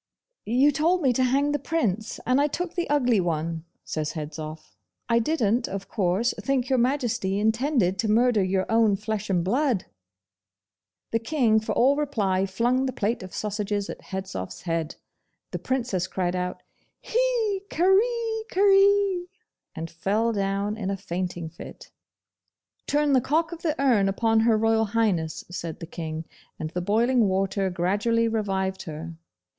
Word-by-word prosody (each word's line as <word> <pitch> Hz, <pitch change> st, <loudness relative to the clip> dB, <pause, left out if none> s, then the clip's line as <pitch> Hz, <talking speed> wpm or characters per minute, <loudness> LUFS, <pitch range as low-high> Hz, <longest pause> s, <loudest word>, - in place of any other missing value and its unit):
'You 260 Hz, +6 st, +4 dB
told 330 Hz, +5 st, +1 dB
me 260 Hz, -3 st, +4 dB
to 255 Hz, -, +1 dB
hang 275 Hz, +3 st, +2 dB
the 290 Hz, -, 0 dB
Prince, 225 Hz, -, -1 dB
and 255 Hz, +3 st, +3 dB
I 290 Hz, -, +3 dB
took 350 Hz, +3 st, -4 dB
the 345 Hz, -4 st, -2 dB
ugly 250 Hz, -7 st, +3 dB
one,' 165 Hz, -1 st, -2 dB, 0.2 s
says 155 Hz, -1 st, -3 dB
Hedzoff. 155 Hz, 0 st, -7 dB, 0.3 s
'I 230 Hz, 0 st, +4 dB
didn't, 235 Hz, -3 st, +1 dB
of 195 Hz, 0 st, -5 dB
course, 200 Hz, +4 st, +1 dB
think 265 Hz, -2 st, 0 dB
Your 260 Hz, -2 st, +3 dB
Majesty 240 Hz, -7 st, 0 dB
intended 220 Hz, -, +1 dB
to 220 Hz, -1 st, 0 dB
murder 230 Hz, -1 st, +3 dB
your 185 Hz, 0 st, 0 dB
own 225 Hz, -2 st, +3 dB
flesh 215 Hz, 0 st, -4 dB
and 180 Hz, -3 st, +1 dB
blood!' 245 Hz, -, +1 dB, 1.3 s
The 230 Hz, -, +1 dB
King 230 Hz, -3 st, +2 dB
for 220 Hz, -, -3 dB
all 270 Hz, +4 st, +4 dB
reply 205 Hz, -10 st, 0 dB
flung 245 Hz, +7 st, +1 dB
the -, -, -1 dB
plate 230 Hz, 0 st, -1 dB
of 185 Hz, 0 st, -9 dB
sausages 205 Hz, -1 st, -2 dB
at -, -, -10 dB
Hedzoff's 190 Hz, -, -5 dB
head. 165 Hz, -2 st, -2 dB, 0.6 s
The -, -, -3 dB
Princess 235 Hz, -9 st, -1 dB
cried 180 Hz, -1 st, -2 dB
out 180 Hz, 0 st, -3 dB, 0.4 s
'Hee 465 Hz, -5 st, 0 dB
kareekaree!' 400 Hz, -2 st, +3 dB, 0.5 s
and 160 Hz, 0 st, -4 dB
fell 205 Hz, +8 st, 0 dB
down 200 Hz, +1 st, -1 dB
in 195 Hz, -3 st, -3 dB
a 195 Hz, -, -2 dB
fainting 175 Hz, -2 st, -4 dB
fit. 160 Hz, -, -11 dB, 1.0 s
'Turn 295 Hz, -1 st, +2 dB
the 260 Hz, -, +5 dB
cock 320 Hz, +6 st, 0 dB
of 340 Hz, -1 st, -8 dB
the 320 Hz, -2 st, -1 dB
urn 235 Hz, -8 st, +3 dB
upon 225 Hz, +3 st, +2 dB
Her 225 Hz, 0 st, +4 dB
Royal 225 Hz, 0 st, +2 dB
Highness,' 200 Hz, -8 st, 0 dB
said 170 Hz, -3 st, -5 dB
the -, -, -6 dB
King, 160 Hz, -1 st, -6 dB, 0.3 s
and 155 Hz, 0 st, -5 dB
the 180 Hz, -, -2 dB
boiling 230 Hz, +4 st, +2 dB
water 195 Hz, 0 st, 0 dB
gradually 205 Hz, +6 st, +1 dB
revived 195 Hz, -4 st, -1 dB
her. 160 Hz, +1 st, -6 dB
220 Hz, 155 wpm, -25 LUFS, 190-270 Hz, 1.3 s, the